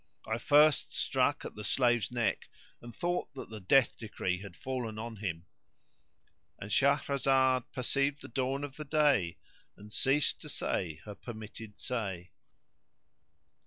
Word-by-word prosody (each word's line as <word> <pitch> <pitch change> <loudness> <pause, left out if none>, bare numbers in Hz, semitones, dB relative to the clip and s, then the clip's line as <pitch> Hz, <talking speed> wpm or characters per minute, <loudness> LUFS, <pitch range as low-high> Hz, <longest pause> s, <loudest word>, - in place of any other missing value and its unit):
I 110 +1 -1
first 150 +2 +5
struck - - +1
at - - -6
the 105 - -8
slave's 120 0 +2
neck 120 -5 -1 0.3
and 120 - -9
thought 175 +9 -2
that 130 - -8
the 110 - -6
death 120 +7 +4
decree 95 -4 -2
had 100 -4 -9
fallen 125 -4 -4
on 115 0 -5
him:"And 95 +2 -10
Shahrazad 135 -1 +3
perceived 140 +3 0
the - - -7
dawn 135 +1 -1
of 140 -2 -6
day 140 - +3 0.4
and 105 +1 -12
ceased 140 +2 +2
to - - -7
say 80 -3 -2
her 105 - -6
permitted 110 -1 -9
say. 95 -7 -3
120 Hz, 130 wpm, -32 LUFS, 105-135 Hz, 0.4 s, first